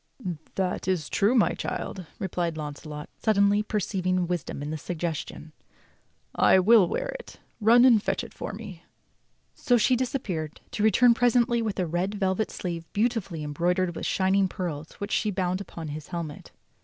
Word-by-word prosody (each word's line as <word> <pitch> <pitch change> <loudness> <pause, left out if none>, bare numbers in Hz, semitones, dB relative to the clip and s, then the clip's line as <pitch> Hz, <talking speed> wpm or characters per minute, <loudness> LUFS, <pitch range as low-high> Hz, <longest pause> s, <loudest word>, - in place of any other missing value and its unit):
"That 185 -1 -1
is 180 -5 0
true, 210 +5 +2
my 230 - +4
child," 185 -4 -5
replied 175 -3 -2
Launcelot, 150 0 -6
suddenly 205 -1 +3
perceiving 185 -4 -1
wisdom 170 -5 -3
in 150 - -4
the 155 - -3
suggestion. 160 -1 -4 0.8
"I - - +5
will 200 0 +6
wear - - -2
it. - - -13 0.2
Run 235 +3 +6
and 235 -5 +6
fetch - - -1
it - - -10
for - - -5
me." 200 -5 -9 0.7
So 245 - +2
she 250 +3 +3
disappeared, 210 - -3
to - - -3
return 235 +3 +5
presently 240 0 +3
with 215 -3 -2
a 180 - +1
red 175 +5 -1
velvet 195 +1 0
sleeve 170 -2 -5
beautifully 205 -7 -1
embroidered 175 +4 0
with - - -3
shining 190 0 +2
pearls 165 -4 -5
which 200 +1 -6
she 215 - +1
bound 185 -1 -1
upon 165 -4 -7
his 150 0 -7
helmet. 165 -4 -6
185 Hz, 160 wpm, -26 LUFS, 170-215 Hz, 0.8 s, will